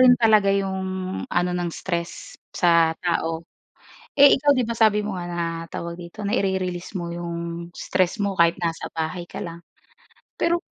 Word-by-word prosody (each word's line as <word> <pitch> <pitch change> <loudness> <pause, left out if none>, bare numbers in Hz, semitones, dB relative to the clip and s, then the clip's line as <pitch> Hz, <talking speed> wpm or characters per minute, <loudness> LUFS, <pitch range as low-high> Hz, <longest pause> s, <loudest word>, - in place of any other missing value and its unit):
rin 250 -1 +8
talaga 215 -4 +4
yung 195 -1 0 0.5
ano 175 +1 +1
ng 175 -1 -1
stress 170 0 -4 0.2
sa 165 -2 +3
tao. 165 -1 -1 0.7
Eh, 280 0 +9
ikaw 290 +2 +2
di 255 -4 +3
ba, 230 - -2
sabi 210 -2 +3
mo 205 - -3
nga 175 -1 -5
na 170 0 -2 0.3
tawag 170 0 -5
dito 175 +4 -7
naire-release 190 -2 -1
mo 170 0 -4
yung 170 0 -5
stress 185 +3 0
mo 200 -1 0
kahit 170 0 +3
nasa 165 -2 -3
bahay 160 +2 -3
ka - - -7
lang. 170 0 -7 0.7
Pero 340 +1 +1
180 Hz, 160 wpm, -24 LUFS, 170-200 Hz, 0.7 s, Eh